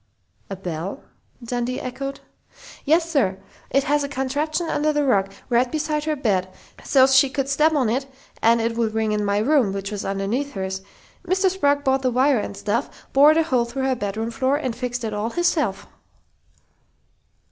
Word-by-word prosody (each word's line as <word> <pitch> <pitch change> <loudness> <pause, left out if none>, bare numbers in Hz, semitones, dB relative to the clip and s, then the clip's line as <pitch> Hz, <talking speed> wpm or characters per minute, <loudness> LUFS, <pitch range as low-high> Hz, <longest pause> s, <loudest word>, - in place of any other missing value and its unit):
"A 195 - -4
bell?" 180 -1 -5 0.4
Dundee 245 +1 -2
echoed. 275 +2 -5 0.6
"Yes, 325 +3 +3
sir. 245 - +1 0.3
It 275 - +2
has 290 0 +1
a 280 - -3
contraption 285 +5 -2
under 305 0 +1
the 295 -1 0
rug, 195 -7 +2 0.2
right 245 0 +2
beside 305 -1 -1
her 310 -1 0
bed, 195 -9 0 0.3
so's 265 -1 +4
she 265 +1 +6
could 270 0 -2
step 300 +3 +3
on 275 -6 +2
it 260 +5 -1 0.3
and 230 +1 +4
it 230 0 -1
would 225 -2 -1
ring 220 -1 0
in 210 0 0
my 200 0 +1
room, 240 -1 +3
which 200 +1 -4
was 205 -1 -4
underneath 200 +9 -2
hers.... 190 -1 -4 0.5
Mr. 380 +1 +2
Sprague 285 -6 +1
bought 265 0 +2
the 255 - +1
wire 255 +1 +3
and 200 - -5
stuff, 225 +5 -3
bored 295 +3 +6
a 325 - +4
hole 255 -7 +1
through 255 +3 -4
her 265 -1 +1
bedroom 220 +1 -3
floor, 265 +3 +1
and 260 -6 -3
fixed 245 0 -4
it 220 -1 -3
all 210 +2 -2
hisself." 305 - 0
255 Hz, 180 wpm, -22 LUFS, 215-285 Hz, 0.6 s, she